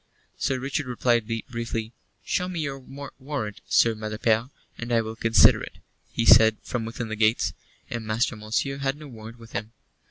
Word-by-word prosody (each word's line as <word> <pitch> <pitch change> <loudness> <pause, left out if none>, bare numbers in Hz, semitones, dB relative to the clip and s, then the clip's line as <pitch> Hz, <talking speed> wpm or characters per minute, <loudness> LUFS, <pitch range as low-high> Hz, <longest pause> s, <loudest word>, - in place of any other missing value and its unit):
Sir 130 - 0
Richard 135 +2 -2
replied 120 -2 +1 0.2
briefly. 115 -2 -4 0.3
"Show 180 -1 0
me 175 -2 -4
your 140 -2 -3 0.4
warrant, 130 -7 -4
Sir 115 - +4
Malapert, 110 +2 0 0.3
and 120 0 -6
I 115 - +4
will 110 0 -5
consider 115 0 +6
it," - - -8 0.3
he 115 - -1
said, 110 -1 +8
from 120 -3 -3
within 115 0 -5
the 110 - -2
gates. 110 +1 +2 0.3
And 120 -1 -4
Master 115 +2 +1
Monceux 110 +6 -2
had 135 +1 -1
no 150 0 -10
warrant 115 -2 -10
with 115 -1 -14
him. 110 +1 -5
115 Hz, 170 wpm, -26 LUFS, 110-130 Hz, 0.4 s, said